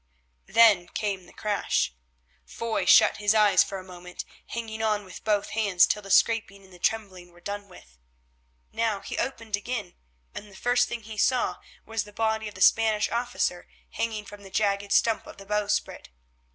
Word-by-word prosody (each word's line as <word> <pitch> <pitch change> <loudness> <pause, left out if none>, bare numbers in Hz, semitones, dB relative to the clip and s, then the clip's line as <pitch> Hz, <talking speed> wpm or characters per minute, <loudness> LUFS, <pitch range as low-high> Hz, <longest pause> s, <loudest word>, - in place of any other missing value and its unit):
Then 215 -6 +5
came 195 -3 -3
the - - -16
crash. 205 - -1 0.5
Foy 230 -1 -3
shut - - +6
his 210 +1 +2
eyes 205 -5 +5
for 195 - -6
a 185 - -8
moment, 180 -1 -9 0.2
hanging 225 -1 -5
on 210 -2 0
with 185 - -11
both 210 -2 0
hands 200 -5 +4
till 210 - -1
the 195 - -12
scraping 205 -2 +2
and 190 -1 -18
the 180 - -15
trembling 185 -4 -2
were 175 - -19
done 205 +3 -6
with. 65 - -17 0.7
Now 225 -3 -1
he - - -5
opened 230 -4 -4
them 205 - +2
again, 210 -6 -5 0.4
and 210 - -8
the - - -15
first 245 +3 +2
thing 240 -2 -5
he 215 0 -9
saw 255 +2 +2 0.3
was 225 -1 -2
the 210 - -15
body 220 0 0
of 210 - -9
the - - -10
Spanish 220 -2 +4
officer 235 -7 -1 0.2
hanging 220 -2 -3
from 205 +1 -11
the 195 - -12
jagged 200 0 0
stump 225 +1 +2
of - - -11
the 195 - -12
bowsprit. 210 - -2
210 Hz, 185 wpm, -26 LUFS, 195-225 Hz, 0.7 s, shut